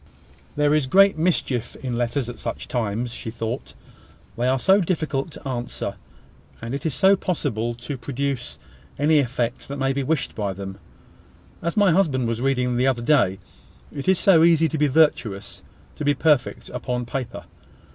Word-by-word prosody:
"There 150 Hz, 0 st, +3 dB
is 150 Hz, -3 st, +2 dB
great 195 Hz, +7 st, +5 dB
mischief 150 Hz, -8 st, 0 dB
in 125 Hz, -3 st, -4 dB
letters 120 Hz, +2 st, -1 dB
at 120 Hz, -, -8 dB
such -, -, -5 dB
times," 115 Hz, 0 st, -2 dB
she 115 Hz, -, -6 dB
thought. 115 Hz, +2 st, -5 dB, 0.6 s
"They 120 Hz, +1 st, 0 dB
are 130 Hz, +1 st, +3 dB
so 195 Hz, +9 st, +4 dB
difficult 155 Hz, -5 st, -1 dB
to -, -, -9 dB
answer! 120 Hz, -2 st, -3 dB, 0.7 s
and 115 Hz, +2 st, -6 dB
it 140 Hz, +4 st, -2 dB
is 145 Hz, -, -2 dB
so 195 Hz, +1 st, +5 dB
possible 120 Hz, -, -2 dB
to 125 Hz, +3 st, -6 dB
produce 135 Hz, 0 st, -3 dB, 0.4 s
any 150 Hz, +2 st, +4 dB
effect 120 Hz, -2 st, -2 dB
that 140 Hz, -, -5 dB
may 135 Hz, 0 st, +1 dB
be 140 Hz, -, -1 dB
wished 145 Hz, +1 st, -1 dB
by 100 Hz, -3 st, -2 dB
them! 95 Hz, 0 st, -8 dB, 0.8 s
As 170 Hz, +3 st, -3 dB
my 200 Hz, -3 st, +5 dB
husband 150 Hz, -9 st, +2 dB
was 115 Hz, 0 st, -2 dB
reading 125 Hz, -2 st, +1 dB
the 125 Hz, +2 st, +2 dB
other 125 Hz, -3 st, 0 dB
day 120 Hz, -9 st, +3 dB, 0.6 s
`It 140 Hz, -, -6 dB
is 190 Hz, -1 st, +4 dB
so 170 Hz, -4 st, +5 dB
easy 165 Hz, -1 st, +5 dB
to 160 Hz, -, -2 dB
be 150 Hz, -, +4 dB
virtuous, 130 Hz, -9 st, +1 dB, 0.4 s
to -, -, -4 dB
be 145 Hz, 0 st, +2 dB
perfect, 145 Hz, -2 st, +1 dB
upon 125 Hz, -1 st, -3 dB
paper!' 125 Hz, +1 st, -5 dB
135 Hz, 175 wpm, -23 LUFS, 120-155 Hz, 0.8 s, great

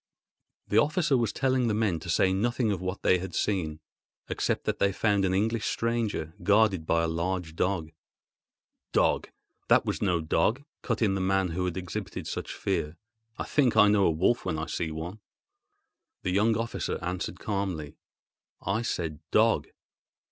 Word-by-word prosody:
The 105 Hz, -, +4 dB
officer 155 Hz, +2 st, +2 dB
was 115 Hz, -4 st, +1 dB
telling 130 Hz, +1 st, +1 dB
the 110 Hz, -, +1 dB
men 105 Hz, -7 st, +1 dB
to 85 Hz, -, -9 dB
say 95 Hz, +3 st, +3 dB
nothing 120 Hz, +3 st, +1 dB
of 95 Hz, -4 st, -2 dB
what 95 Hz, +1 st, -4 dB
they 90 Hz, -, +4 dB
had 95 Hz, -1 st, -6 dB
seen, 80 Hz, -6 st, -1 dB, 0.5 s
except -, -, -1 dB
that -, -, -1 dB
they 100 Hz, -, +3 dB
found 100 Hz, 0 st, +1 dB
an 95 Hz, 0 st, +1 dB
English 110 Hz, +2 st, 0 dB
stranger, 115 Hz, -8 st, -1 dB
guarded 100 Hz, -3 st, +3 dB
by 85 Hz, 0 st, +2 dB
a -, -, +1 dB
large 85 Hz, 0 st, -2 dB
dog. 90 Hz, -3 st, -1 dB, 1.0 s
"Dog! -, -, +2 dB, 0.4 s
that -, -, +5 dB
was -, -, -2 dB
no 90 Hz, -4 st, +2 dB
dog," 110 Hz, -, +1 dB, 0.2 s
cut 115 Hz, -1 st, -1 dB
in 100 Hz, -3 st, +3 dB
the 95 Hz, -, -1 dB
man 95 Hz, 0 st, +1 dB
who 90 Hz, +2 st, -2 dB
had 90 Hz, -1 st, -3 dB
exhibited 90 Hz, -2 st, -5 dB
such -, -, -4 dB
fear. 75 Hz, +2 st, -2 dB, 0.4 s
"I -, -, -2 dB
think 135 Hz, -6 st, +2 dB
I 105 Hz, -, +7 dB
know 100 Hz, -2 st, +4 dB
a -, -, +5 dB
wolf 85 Hz, +9 st, +2 dB
when -, -, -2 dB
I 80 Hz, -, -2 dB
see 80 Hz, -, -3 dB
one." 80 Hz, +6 st, -6 dB, 1.0 s
The -, -, 0 dB
young 105 Hz, +4 st, +3 dB
officer 115 Hz, +1 st, -2 dB
answered 90 Hz, +1 st, -3 dB
calmly: 95 Hz, -8 st, -3 dB, 0.6 s
"I 100 Hz, +4 st, -1 dB
said 85 Hz, -8 st, -2 dB
a -, -, -40 dB
dog." -, -, +3 dB
95 Hz, 175 wpm, -28 LUFS, 85-110 Hz, 1.0 s, I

